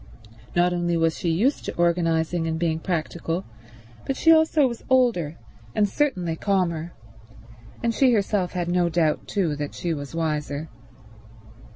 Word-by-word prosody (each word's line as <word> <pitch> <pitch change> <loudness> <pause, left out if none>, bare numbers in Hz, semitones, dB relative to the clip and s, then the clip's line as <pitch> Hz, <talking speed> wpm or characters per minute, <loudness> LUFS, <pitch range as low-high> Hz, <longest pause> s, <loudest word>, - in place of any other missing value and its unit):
Not 175 +1 +3
only 175 -1 0
was 165 -1 +2
she 170 - -2
used 220 - +1
to - - -4
organizing 170 -1 +1
and 160 0 -1
being 160 -1 0
practical, 170 0 -3 0.6
but 270 - -3
she 325 - +5
also 315 -2 +5
was 235 -2 -6
older, 230 - +2 0.4
and 210 - +3
certainly 185 - 0
calmer; 175 -3 -1 0.9
and 230 -1 +1
she 260 +2 +4
herself 200 -4 0
had 175 -2 -2
no 175 0 +2
doubt 160 -2 0
too 175 -7 0
that 145 -1 -5
she 170 -2 -2
was 145 0 -6
wiser. 150 -1 -2
175 Hz, 150 wpm, -24 LUFS, 160-200 Hz, 0.9 s, she